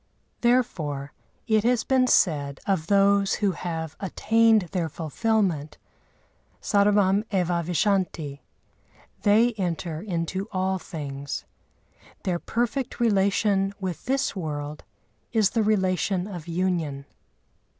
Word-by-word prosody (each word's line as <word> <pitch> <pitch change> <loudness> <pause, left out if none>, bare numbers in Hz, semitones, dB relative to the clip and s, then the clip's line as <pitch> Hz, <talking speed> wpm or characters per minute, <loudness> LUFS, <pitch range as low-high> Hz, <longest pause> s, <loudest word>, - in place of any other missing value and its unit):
Therefore 155 - 0 0.3
it 220 -1 +2
has 240 0 +2
been 260 -1 +3
said 145 - +2
of 185 -5 0
those 200 0 +4
who 205 -2 +1
have 160 -2 -5
attained 225 +2 +3
their 175 -4 -1
fulfilment,—"sarvam 200 +3 -1
evá 180 -4 0
vishanti" 170 -4 0 0.8
(they 225 +3 +4
enter 170 -3 -2
into 190 0 -3
all 190 -1 0
things). 140 -4 -6 0.8
Their 175 -2 -1
perfect 240 +5 -2
relation 200 -2 +2
with 185 -4 -5
this 270 -2 0
world 150 -4 -5 0.5
is 215 -3 +3
the 230 - +1
relation 190 -3 +1
of 180 -6 -8
union. 165 -6 -1
190 Hz, 100 wpm, -25 LUFS, 165-210 Hz, 0.8 s, those